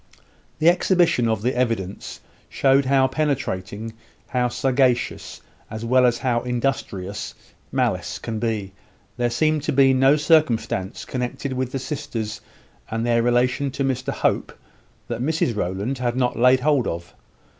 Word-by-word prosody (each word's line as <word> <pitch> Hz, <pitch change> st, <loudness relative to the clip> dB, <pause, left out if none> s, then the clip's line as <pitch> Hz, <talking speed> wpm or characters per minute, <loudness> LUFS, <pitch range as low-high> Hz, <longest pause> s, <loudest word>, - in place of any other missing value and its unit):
The 155 Hz, -, +2 dB
exhibition 175 Hz, -7 st, +3 dB
of 110 Hz, -2 st, -1 dB
the 125 Hz, +2 st, 0 dB
evidence 115 Hz, -6 st, -2 dB, 0.3 s
showed 135 Hz, 0 st, +3 dB
how 135 Hz, 0 st, +4 dB
penetrating, 115 Hz, -7 st, -2 dB, 0.4 s
how 125 Hz, -1 st, +1 dB
sagacious, 130 Hz, -1 st, 0 dB, 0.3 s
as 110 Hz, +1 st, -6 dB
well 125 Hz, +1 st, +4 dB
as 120 Hz, -1 st, +1 dB
how 120 Hz, -2 st, 0 dB
industrious, 115 Hz, -6 st, -3 dB, 0.4 s
malice -, -, -1 dB
can 110 Hz, -1 st, -5 dB
be. 105 Hz, -4 st, -2 dB, 0.4 s
There 120 Hz, -1 st, +1 dB
seemed 155 Hz, +5 st, +1 dB
to 145 Hz, -, -1 dB
be 135 Hz, -1 st, +5 dB
no 135 Hz, +2 st, +5 dB
circumstance 145 Hz, -, +1 dB
connected 130 Hz, +2 st, -3 dB
with 130 Hz, -1 st, -2 dB
the 135 Hz, -, -2 dB
sisters 130 Hz, -6 st, -5 dB, 0.5 s
and 115 Hz, +1 st, -2 dB
their 115 Hz, -1 st, +2 dB
relation 125 Hz, +3 st, +1 dB
to 140 Hz, +1 st, -3 dB
Mr 130 Hz, -1 st, -1 dB
Hope, -, -, -1 dB, 0.5 s
that 120 Hz, 0 st, -4 dB
Mrs 145 Hz, -4 st, 0 dB
Rowland 100 Hz, +7 st, -2 dB
had 120 Hz, -1 st, -1 dB
not 125 Hz, -1 st, 0 dB
laid 125 Hz, +2 st, +4 dB
hold 145 Hz, -3 st, +2 dB
of. 85 Hz, +1 st, -5 dB
125 Hz, 145 wpm, -22 LUFS, 115-135 Hz, 0.5 s, be